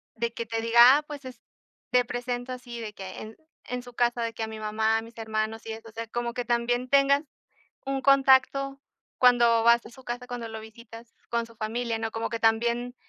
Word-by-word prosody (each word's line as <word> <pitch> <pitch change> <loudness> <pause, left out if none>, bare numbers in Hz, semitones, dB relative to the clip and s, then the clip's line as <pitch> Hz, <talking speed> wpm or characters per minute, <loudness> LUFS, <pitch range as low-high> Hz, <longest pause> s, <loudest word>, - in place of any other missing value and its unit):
de 230 0 -2
que 235 - -5
te 225 +1 -2
diga: 235 +4 +7
"Ah, 300 - -3
pues 295 -2 -9
es 255 -1 -9 0.5
te 250 0 +4
presento, 245 +1 -4
así 245 -2 -7
de 215 -2 -6
que 190 -2 -8
en 220 +1 -10 0.3
en 250 0 -3
su 245 0 -13
casa, 240 0 +1
de 230 - -2
que 225 - -4
a - - -3
mi 220 0 -8
mamá, 220 +1 +1
a - - -2
mis 230 +1 -14
hermanos", 220 0 -3
y 225 - -5
eso, 225 +1 -10
o - - -15
sea, 230 +1 -6
como 235 +1 -3
que 245 0 -3
también 245 +1 0
tengas 280 +1 +4 0.6
un 270 0 -2
contacto 275 0 +4 0.4
cuando 240 -2 +5
vas 235 +1 +5
a - - -10
su 260 +2 -15
casa, 245 0 -5
cuando 245 -2 -5
lo 220 0 -7
visitas 230 +1 -13 0.2
con 235 0 -1
su 230 0 -18
familia, 230 +1 -2
¿no? 225 0 -3
Como 225 +1 -3
que 230 - -4
también 235 +2 +1
235 Hz, 225 wpm, -27 LUFS, 225-245 Hz, 0.6 s, diga